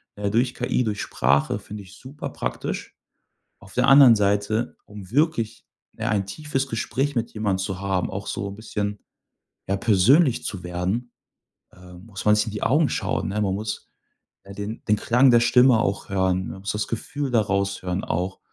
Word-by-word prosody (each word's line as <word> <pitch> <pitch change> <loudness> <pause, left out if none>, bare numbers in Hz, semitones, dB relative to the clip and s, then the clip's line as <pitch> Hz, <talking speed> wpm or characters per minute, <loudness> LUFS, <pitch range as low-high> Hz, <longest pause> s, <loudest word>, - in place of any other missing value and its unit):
äh, 100 0 -2
durch 120 +4 +1
KI, 125 0 0
durch 105 -3 -2
Sprache 70 +10 +1
finde 105 0 -9
ich 95 0 -15
super 140 +3 -7
praktisch. - - -5 0.6
Auf - - -16
der - - +2
anderen 135 -4 +8
Seite, 105 +2 0
um 100 -2 -11
wirklich, 120 -6 0 0.3
ne, 110 - -4
ein 100 -2 +1
tiefes 135 +6 -3
Gespräch 135 +5 -2
mit 115 -1 -1
jemand 105 -3 -1
zu 95 -1 -3
haben, 95 -2 -1
auch 95 +1 -5
so 100 - -3
'n 100 - -8
bisschen, 105 -2 -4 0.7
ja, 100 - +1
persönlich 120 - +4
zu 95 -4 -5
werden, 90 +8 -3 0.6
ähm, 90 +1 -14
muss 100 -5 -8
man 105 0 +6
sich 105 - +1
in 110 - -5
die 105 - -5
Augen 150 +2 +3
schauen, - - -2
ne? 105 +2 -1
Man 95 -2 0
muss, 105 +1 -5 0.5
äh, 100 - -11
den 100 +3 -6
den 105 - +4
Klang 125 +5 +4
der 120 - +6
Stimme 120 0 +5
auch 100 -2 -2
hören, 95 -1 +1
ne? - - -6
Man 95 - -10
muss 100 +1 -3
das 105 0 -2
Gefühl 135 +4 -4
daraus 100 -3 0
hören 90 +1 -3
auch 90 +2 -2
105 Hz, 190 wpm, -24 LUFS, 95-120 Hz, 0.7 s, anderen